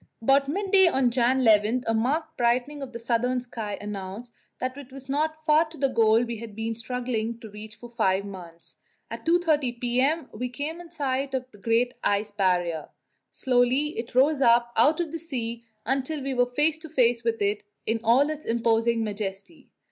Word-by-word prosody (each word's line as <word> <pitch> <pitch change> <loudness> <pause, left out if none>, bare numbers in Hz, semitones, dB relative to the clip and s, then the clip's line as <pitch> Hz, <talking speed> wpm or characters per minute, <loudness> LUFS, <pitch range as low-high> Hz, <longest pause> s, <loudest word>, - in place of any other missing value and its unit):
About 275 +4 +3
midday 385 +3 +4
on 265 -6 +2
January 255 +2 +2 0.2
11 230 +5 -2
a 225 - +1
marked 265 +9 0
brightening 250 +5 0
of 270 -2 -6
the 235 - -6
southern 240 +2 0
sky 225 -4 -6
announced 205 +3 -7 0.3
that 255 +1 -3
it 280 -2 -11
was 270 0 -11
not 310 +3 -2
far 310 +1 +5
to 315 0 -13
the 275 0 +1
goal 225 -2 +4
we 235 -1 -4
had 220 -2 -9
been 225 +1 -2
struggling 235 -1 -3
to 220 -3 -11
reach 215 +1 -9
for 240 +3 -11
five 200 -5 0
months. 175 -4 -11 0.3
At - - -7
2.30 305 -8 +2
p.m. 260 +7 +1
we 250 0 -4
came 295 +7 -5
in 345 - -12
sight 275 -4 -2
of 255 0 -4
the 205 - -17
Great 235 +4 +1
Ice 205 +1 +1
Barrier. 180 -5 0 0.4
Slowly 255 +3 +2
it 230 +1 -6
rose 275 +2 +4
up 235 -1 +4
out 295 +8 +4
of 335 -3 -2
the 330 - -4
sea 235 -7 -4 0.2
until 270 +4 -1
we 275 0 -2
were 245 -1 +2
face 300 +5 +1
to 320 0 -9
face 245 -5 +2
with 230 -1 0
it 205 +1 0 0.2
in 225 +1 0
all 265 +7 +4
its 305 0 -7
imposing 230 0 +1
majesty. 205 - -6
245 Hz, 190 wpm, -26 LUFS, 225-280 Hz, 0.4 s, far